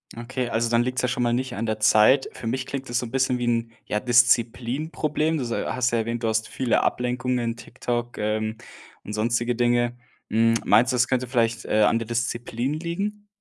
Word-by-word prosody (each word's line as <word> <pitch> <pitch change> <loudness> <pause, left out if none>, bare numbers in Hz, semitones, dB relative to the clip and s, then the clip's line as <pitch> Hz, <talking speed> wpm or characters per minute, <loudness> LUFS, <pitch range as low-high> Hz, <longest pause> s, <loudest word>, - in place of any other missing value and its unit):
Okay, 120 +1 -4
also 115 +1 0
dann 120 0 +3
liegt's 125 0 -1
ja 125 - +1
schon 125 -1 -1
mal 120 0 +1
nicht 130 0 -2
an 115 - -2
der 110 -1 -2
Zeit. 110 +5 +5
Für - - -9
mich 130 +3 -2
klingt 135 -1 -5
es 120 - 0
so 125 - -3
'n - - -12
bisschen 130 -1 +1
wie 120 - -1
'n, 115 -1 0 0.2
ja, 105 - 0
Disziplinproblem. 130 +6 +1
Du 130 - -2
so 115 -1 -3
hast 125 0 0
ja 115 - +1
erwähnt, 115 +1 -2
du - - +1
hast 110 0 0
viele 130 -3 0
Ablenkungen, 125 -1 -1
TikTok, 120 0 -4
ähm, 110 +1 -1 0.5
und 105 - -7
sonstige 120 +2 0
Dinge. 120 0 +1 0.3
Hm, 115 +1 +3
meinst 125 +3 +4
du, 125 - 0
das 120 0 +3
könnte 130 -1 0
vielleicht, 115 -2 0
äh, 110 - +2
an 105 +2 +4
der 115 -1 -4
Disziplin 120 +2 -2
liegen? 200 +6 -4
120 Hz, 210 wpm, -24 LUFS, 115-130 Hz, 0.5 s, Zeit